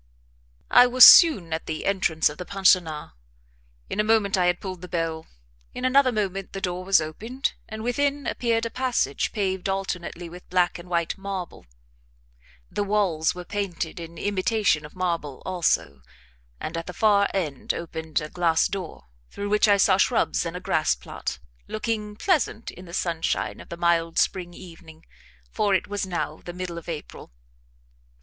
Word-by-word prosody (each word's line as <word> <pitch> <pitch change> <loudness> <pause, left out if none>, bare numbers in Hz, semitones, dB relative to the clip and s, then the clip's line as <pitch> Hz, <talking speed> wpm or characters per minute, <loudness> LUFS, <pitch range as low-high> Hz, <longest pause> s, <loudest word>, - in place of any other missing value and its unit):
I 245 0 +8
was 250 0 +9
soon 200 - +8
at 160 - -4
the 155 -1 -4
entrance 185 -5 +2
of 150 - -5
the - - -3
pensionnat, 180 -5 +2 0.8
in - - -4
a - - +4
moment 215 -2 +2
I 180 -2 +2
had 180 0 +1
pulled 185 -3 -7
the 180 - -8
bell; 165 -2 -3 0.5
in 250 - -3
another 260 0 +4
moment 195 -3 -3
the 195 - -4
door 180 -1 -3
was 195 0 +4
opened, 220 - -3 0.2
and 220 0 -6
within 280 +3 0
appeared 230 -2 0
a 230 - -4
passage 250 - -1
paved 190 -3 -2
alternately 180 -3 -4
with 180 +2 -12
black 180 -1 +1
and 175 +1 -12
white 170 +2 -1
marble; 190 - -6 1.0
the - - -2
walls 195 -7 +1
were 180 0 -7
painted 190 -5 -4
in 165 0 -9
imitation 200 -4 0
of - - -22
marble 170 -7 -3
also; 180 -2 0 0.6
and 165 - -5
at 165 - -4
the 180 - -6
far 200 0 +3
end 155 -9 -2
opened 160 -1 -4
a 150 - -6
glass 165 -2 +2
door, 185 - -6 0.3
through 205 0 -5
which 210 +1 +3
I 205 -1 +5
saw 195 -1 +4
shrubs 210 -4 +1
and 170 +2 -5
a - - -6
grass 155 - +1
plat, - - -6 0.3
looking 215 -1 -3
pleasant 295 - 0
in 180 - -12
the 170 - -12
sunshine 170 -3 -1
of - - -13
the 170 - -7
mild 170 -1 +1
spring 175 -2 0
evening 165 -2 -13 0.5
for 205 -2 +1
it 185 - -1
was 205 -1 -3
now 175 -2 -3
the 175 - -7
middle 180 -1 -5
of 170 - -12
April. 155 - -8
185 Hz, 170 wpm, -25 LUFS, 170-205 Hz, 1.0 s, was